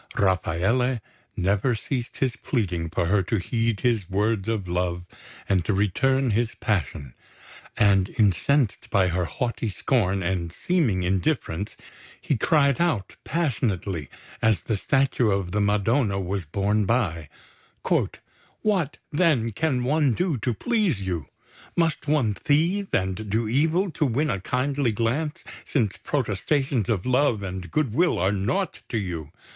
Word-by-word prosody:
Rafaele 100 +7 +1 0.4
never 100 +6 +1
ceased 120 +2 -4
his 130 -3 0
pleading 90 - -2
for 85 - 0
her 100 +3 +3
to 100 +4 -1
heed 115 +2 -1
his 115 -7 +1
words 105 +1 0
of 105 -5 -1
love 90 0 -1 0.4
and 95 -3 +2
to 105 - +1
return 130 +7 +2
his 115 +2 0
passion; 75 - -2 0.6
and 100 -2 +4
incensed 110 - +2
by 95 -2 +3
her 90 +1 0
haughty 115 - -2
scorn 100 -3 0
and 85 -2 -1
seeming 120 - +1
indifference, 95 - -1 0.4
he 145 - 0
cried 140 +3 +3
out 140 - 0
passionately 100 - -1 0.3
as 110 -2 +3
the 110 - -1
Statue 125 +3 +2
of 95 -3 0
the 105 +2 0
Madonna 105 +1 +2
was 95 -1 -3
borne 100 +5 0
by: 85 - 0 1.3
"What, 185 -9 +1
then, 145 -8 +2
can 130 +1 0
one 145 0 +2
do 180 -4 0
to 120 +1 -1
please 200 - 0
you? 85 -6 -3 0.5
Must 165 -3 +1
one 140 -8 +2
thieve 170 - +1
and 95 +3 -1
do 110 +2 0
evil 160 - +2
to 155 -2 0
win 135 +4 +1
a 100 - -2
kindly 130 +2 0
glance, 145 +9 -1 0.2
since 110 -9 0
protestations 130 -1 -1
of 100 -6 0
love 125 -4 +2
and 95 -1 -5
good 150 -8 0
will 170 +7 +3
are 95 +3 +2
naught 105 - -1
to 115 - -1
you? 85 -7 -4
110 Hz, 140 wpm, -25 LUFS, 95-135 Hz, 1.3 s, and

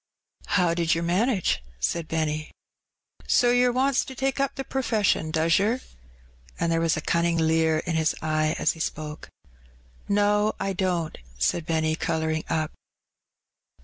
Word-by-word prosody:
"How 175 -3 +3
did 170 -1 +1
yer 165 - -2
manage?" 185 - +1 0.2
said 155 - -1
Benny. 155 -1 -2 0.8
"So 245 -1 +4
yer 245 0 +4
wants 265 +2 +2
to 265 - -9
take 270 +2 -1
up 275 0 0
the 270 - -4
per 265 0 -2
fession, 210 -9 +1
does 165 +2 +3
yer?" 220 +6 +1 0.8
And 170 - +1
there 165 0 +1
was 165 -1 +1
a - - -2
cunning 170 +1 +1
leer 160 0 +2
in 170 - -1
his 160 -1 +1
eye 155 0 0
as - - +2
he 165 - -11
spoke. 155 -1 -5 0.8
"No, 205 +1 +2
I 195 - -1
don't," 180 -4 -1 0.2
said 155 - 0
Benny, 160 -1 +1
colouring 160 -1 -1
up. 155 -2 -1
165 Hz, 155 wpm, -25 LUFS, 160-205 Hz, 0.8 s, So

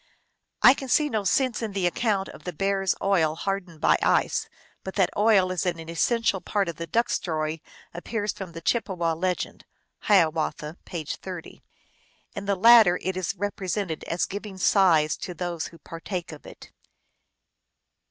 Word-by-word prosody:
I 255 - +9
can 270 -1 -7
see 295 +3 +3
no 220 -5 -1
sense 250 +5 +1
in 220 -3 -4
the 195 -2 -1
account 195 +1 0
of - - -13
the 180 - -4
bear 195 +4 0
s 195 - +1
oil 165 -6 +2
hardened 180 -2 -4
by - - +4
ice, - - +1 0.3
but 190 - -7
that 190 -3 +2
oil 205 -3 +4
is 185 - -1
an 175 -2 -1
essential 190 +5 0
part 200 -3 -1
of 170 -2 -5
the 170 - -5
duck 235 +8 +1
story 155 -2 -2 0.3
appears 205 +4 -3
from 185 -3 -8
the 165 - -8
Chippewa 175 -5 0
legend 180 +2 -3 0.4
(Hiawatha 165 -6 +2
L. 155 +4 -8
p. 170 -3 -5
30). 180 +2 -7 0.7
In 200 -1 -5
the 200 0 +1
latter 220 -3 +7
it 190 0 -2
is 185 -1 -2
represented 195 -3 -3
as 170 - -1
giving 200 0 -7
size 175 -5 +3
to 180 - -7
those 175 -1 -3
who 165 - -14
partake 170 +2 -6
of 155 - -12
it. - - -13
185 Hz, 170 wpm, -25 LUFS, 170-205 Hz, 0.7 s, I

